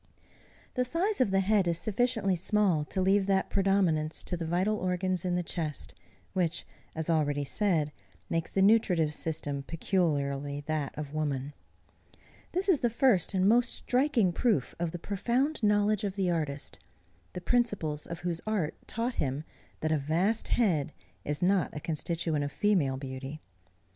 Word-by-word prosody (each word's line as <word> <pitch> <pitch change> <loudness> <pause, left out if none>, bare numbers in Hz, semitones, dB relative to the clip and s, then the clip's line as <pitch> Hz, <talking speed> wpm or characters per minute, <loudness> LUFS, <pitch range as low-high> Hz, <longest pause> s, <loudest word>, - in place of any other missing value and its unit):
The 250 - +1
size 340 - 0
of 255 - +3
the 195 0 +3
head 200 -1 +2
is 170 -1 +1
sufficiently 215 -1 +1
small 185 -3 +2
to 190 - -3
leave 195 +1 +3
that 195 -1 +1
predominance 185 -6 +1
to 180 - -1
the 165 -1 -4
vital 185 +6 +1
organs 185 -1 -1
in 180 -1 +1
the 180 - 0
chest, 160 -3 -4 0.4
which, 175 -2 -1 0.3
as 160 -1 -3
already 145 -3 +1
said, 160 -2 +1 0.4
makes 165 +6 -1
the 195 - +2
nutritive 185 -8 +4
system 145 -3 -2
peculiarly 145 -4 -1
that 150 -3 -2
of 150 -1 -5
woman. 145 -2 -2 1.0
This 375 +3 -1
is 360 -7 +4
the 240 - +2
first 225 -6 +2
and 190 0 +3
most 235 +3 +4
striking 250 - +2
proof 210 - +1
of 170 -1 0
the 175 - -5
profound 240 - -1
knowledge 210 -1 +2
of 195 -2 -2
the 190 -3 +1
artist, 150 -4 -3 0.5
the - - -4
principles 185 -9 0
of 170 -1 -6
whose 170 -2 -2
art 200 -8 0
taught 235 +2 -2
him 140 +1 -1 0.4
that 155 - 0
a 155 - +2
vast 175 +10 0
head 165 - +1 0.3
is 145 +3 -2
not 190 -1 +2
a - - -2
constituent 160 0 -1
of 145 - -3
female 165 -11 +1
beauty. 135 +2 -6
180 Hz, 160 wpm, -29 LUFS, 155-205 Hz, 1.0 s, nutritive